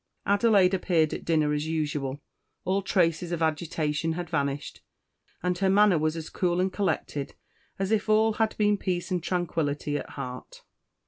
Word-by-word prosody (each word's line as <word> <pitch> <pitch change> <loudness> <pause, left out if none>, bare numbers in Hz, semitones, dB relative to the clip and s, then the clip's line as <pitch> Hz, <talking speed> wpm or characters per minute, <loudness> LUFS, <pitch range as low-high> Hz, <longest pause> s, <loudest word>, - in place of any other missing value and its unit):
Adelaide 200 -2 +4
appeared 170 -4 +2
at - - -5
dinner 155 -3 +2
as 150 +1 -1
usual. 145 -3 -2 0.4
All 190 +2 +1
traces 175 -2 +1
of 170 -1 -1
agitation 160 0 -1
had 175 0 -5
vanished; 140 -2 -2 0.6
and 180 0 +1
her 190 -1 +2
manner 200 -3 +5
was 155 +1 0
a 165 -1 -6
cool 175 -1 0
and 185 0 0
collected 150 -8 -2 0.4
as 195 +1 -2
if 215 0 +1
all 220 +1 +4
had 220 0 0
been 210 -1 +3
peace 180 -1 -2
and 180 -1 0
tranquillity 155 -5 -1
at - - -8
heart. 125 -1 -8
175 Hz, 165 wpm, -27 LUFS, 155-190 Hz, 0.6 s, manner